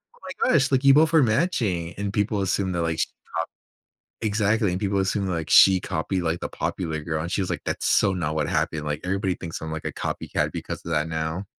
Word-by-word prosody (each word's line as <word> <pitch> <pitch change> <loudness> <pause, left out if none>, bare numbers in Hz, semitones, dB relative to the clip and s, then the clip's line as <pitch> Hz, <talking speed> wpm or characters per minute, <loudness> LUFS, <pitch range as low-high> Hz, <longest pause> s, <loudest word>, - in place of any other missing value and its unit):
"Oh - - -23 0.2
my - - +3
gosh, 140 -4 +3
like, 135 0 +2
you 140 0 +7
both 160 +1 +4
are 160 - +6
matching." 110 - 0
And 100 -1 -2
people 105 0 0
assume 95 0 0
that, 85 - -1
like, 80 -1 -1
she - - +3 1.0
copied - - -11
exactly, 105 0 +1
and 90 - -2
people 100 -1 0
assume 95 +1 0
that, 90 - -1
like, 80 -1 -3
she 95 -1 +7
copied, 90 +3 -2
like, 85 0 -1
the - - -3
popular 80 -4 -3
girl. 80 -1 -2
And 85 - -5
she 100 - 0
was 95 - -2
like, - - -3
"That's - - -2
so 100 -2 +3
not 80 -4 -2
what 75 -1 0
happened. 75 -1 -1
Like, 75 +1 -3
everybody 95 0 0
thinks 85 -2 -6
I'm, 80 0 -5
like, 80 0 -5
a - - -2
copycat - - -2
because - - -6
of 85 - -5
that 75 0 +1
now." 80 +4 -3
95 Hz, 245 wpm, -24 LUFS, 80-105 Hz, 1.0 s, you